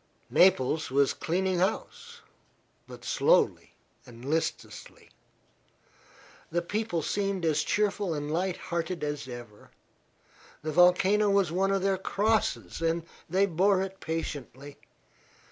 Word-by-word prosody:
Naples 160 -4 +3
was 140 +1 +2
cleaning 185 +2 -1
house, 465 - -3 0.7
but - - -12
slowly - - +2 0.3
and 120 -1 -13
listlessly. 160 +3 -4 1.4
The 175 +1 -1
people 205 -3 -2
seemed 195 +1 -1
as 155 -2 +2
cheerful 205 -2 0
and 145 0 -4
light 180 +2 -1
hearted 170 -1 -4
as 145 -2 -3
ever. 120 -4 -10 0.9
The 155 - -2
volcano 185 +5 +4
was 200 -4 +2
one 190 +3 +1
of 195 -1 0
their 195 -1 +1
crosses, 210 -1 0
and 165 0 0 0.3
they 190 +4 +3
bore 190 +2 +2
it 195 0 -7
patiently. 145 -3 -5
180 Hz, 115 wpm, -28 LUFS, 155-195 Hz, 1.4 s, volcano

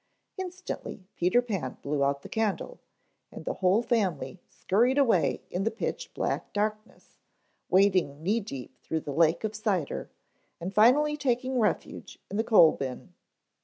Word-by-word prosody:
Instantly 365 - -6
Peter 185 +8 +3
Pan 195 - -4
blew 145 0 0
out 140 0 0
the - - -8
candle 225 - -2 0.5
and - - -10
the - - -1
whole 190 +5 +3
family 195 - -1
scurried 240 +8 +1
away 230 - +2
in 180 - -1
the 220 - +2
pitch 225 - -4
black - - -2
darkness, 215 +1 -4 0.5
wading 185 -6 +3
knee 210 +6 +2
deep 135 - -9
through 160 -1 -3
the 145 - -5
lake 165 +4 +3
of 215 -1 -2
cider, 200 -8 -2 0.5
and 180 +3 -5
finally 280 +8 +5
taking 260 -2 0
refuge 215 - -2
in 200 - -2
the 220 - +2
coal 185 -9 +7
bin. 130 -2 -6
205 Hz, 150 wpm, -28 LUFS, 170-235 Hz, 0.5 s, coal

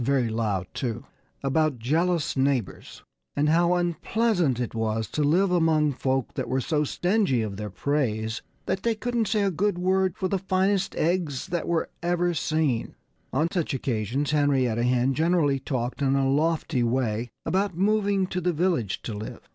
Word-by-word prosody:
very 130 -2 +1
loud, 110 -4 -1
too) 120 0 -3 0.4
about 150 0 +1
jealous 160 +7 0
neighbors 135 -6 -1 0.3
and 150 +1 +2
how 170 +2 +3
unpleasant 175 - +1
it 120 - -3
was 110 -1 -1
to 150 - -3
live 175 +6 +3
among 160 -4 +3
folk 130 -1 -1
that - - -4
were 130 +1 +1
so 150 +3 0
stingy 175 - +1
of 105 -2 -4
their 105 +1 -5
praise 110 -2 -1 0.2
that 190 0 -1
they 230 -1 +1
couldn't 235 0 -1
say 210 0 +1
a 195 - +1
good 195 +3 0
word 185 0 +1
for 190 - -1
the 195 +1 -1
finest 190 +1 0
eggs 165 -5 0
that 175 -1 -3 0.3
ever 175 0 +1
were - - 0
seen! 155 -6 0 0.4
On 155 +5 +1
such 170 -6 -1
occasions 130 +3 -1
Henrietta 135 -6 +2
Hen 125 +2 +2
generally 160 -2 +2
talked 130 0 -3
in 135 -1 +2
a 135 -1 +2
lofty 155 -1 +1
way 120 -1 0 0.2
about 190 -2 0
moving 200 0 +2
to 185 0 -3
the 180 0 +1
village 160 - 0
to 115 - -4
live. 105 +1 -7
150 Hz, 170 wpm, -26 LUFS, 125-180 Hz, 0.4 s, how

